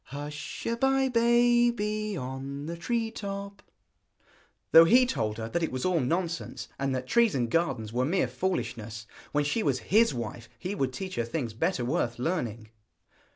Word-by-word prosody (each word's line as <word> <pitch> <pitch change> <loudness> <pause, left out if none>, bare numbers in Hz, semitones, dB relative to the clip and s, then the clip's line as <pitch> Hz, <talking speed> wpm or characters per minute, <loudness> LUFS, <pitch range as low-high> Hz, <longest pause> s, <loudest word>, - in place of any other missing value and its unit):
Hush 145 +2 -7
a 230 - 0
bye, 270 +2 +2
baby, 235 -3 +2
on 135 +2 -5
the 170 +2 -4
tree 225 +6 -1
top; 200 -1 -6 1.1
though 165 0 +10
he 250 +8 +6
told 110 - -2
her 110 -1 -4
that 170 - -1
it 165 - -1
was 130 0 -3
all 180 -2 +2
nonsense, 170 +5 -2
and 135 -1 0
that 130 0 -3
trees 235 - +3
and 120 -3 0
gardens 130 -10 0
were 125 +1 +1
mere 180 +8 +1
foolishness. 115 - -3 0.3
When 145 0 +2
she 145 +10 0
was 140 -9 +1 0.2
his 230 +2 +6
wife 120 -2 -6
he 185 +10 -4
would 135 -9 -1
teach 185 +8 -6
her 120 - +1
things 115 -1 -3
better 120 +2 0
worth 120 -1 -1
learning. 120 - -2
160 Hz, 170 wpm, -28 LUFS, 125-210 Hz, 1.1 s, though